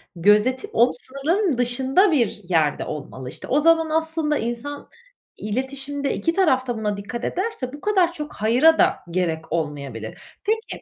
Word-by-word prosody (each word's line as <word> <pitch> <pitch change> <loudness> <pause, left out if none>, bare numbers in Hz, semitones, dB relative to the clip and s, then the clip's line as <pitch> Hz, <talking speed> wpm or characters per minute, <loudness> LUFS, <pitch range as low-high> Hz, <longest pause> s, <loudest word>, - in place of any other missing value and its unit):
gözetip 210 +8 +3
o 240 +2 +4
sınırların 285 - -1
dışında 265 +10 +2
bir 235 -8 +1
yerde 160 -4 +1
olmalı. 130 -4 -7
İşte, - - -8
o 285 - +2
zaman 325 0 +4
aslında 320 -1 0
insan 240 +5 -5 0.5
iletişimde 270 +5 -3
2 330 - 0
taraf 265 -9 +2
da 240 - -2
buna 210 -2 -2
dikkat 235 +4 -6
ederse 355 - -3
bu 290 - -9
kadar 380 -4 +2
çok 300 -3 -6
"hayır"a 250 +10 +4
da - - +3
gerek 165 -3 -2
olmayabilir. 140 -9 -4 0.2
Peki 445 +2 -2
260 Hz, 150 wpm, -22 LUFS, 210-320 Hz, 0.5 s, o